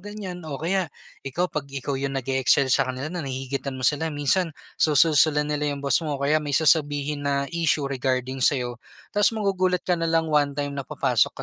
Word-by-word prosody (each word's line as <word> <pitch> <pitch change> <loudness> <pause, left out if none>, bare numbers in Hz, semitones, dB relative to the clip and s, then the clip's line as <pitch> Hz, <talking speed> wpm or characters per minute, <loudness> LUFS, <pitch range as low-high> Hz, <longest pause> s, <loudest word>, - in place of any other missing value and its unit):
ganyan. 200 -3 -7
O 140 - -4
kaya, 180 +2 -1 0.3
ikaw 140 +7 -2
'pag 145 -2 -3
ikaw 140 +1 -4
yung 135 0 -2
nag-e-excel 130 0 +2
sa - - +3
kanila 130 +6 -4
na 175 - -3
nahihigitan 135 0 -4
mo 130 - -5
sila, 155 +2 +2
minsan 155 +4 +1 0.3
susulsulan 150 -1 +4
nila 150 0 -1
yung 140 - -9
boss 140 +1 +3
mo 150 -3 -3
o - - -12
kaya 155 +2 +3
may 145 -2 -1
sasabihin 145 -2 +2
na 140 0 +1
issue 165 -3 +1
regarding 130 -1 -2
sa'yo. 125 -3 +1 0.3
Ta's 205 0 +4
magugulat 185 -3 0
ka 180 -2 0
nalang 165 -1 +1
one 145 -1 +2
time 145 -1 -2
na 140 - -4
papasok - - +1
145 Hz, 190 wpm, -24 LUFS, 135-165 Hz, 0.3 s, susulsulan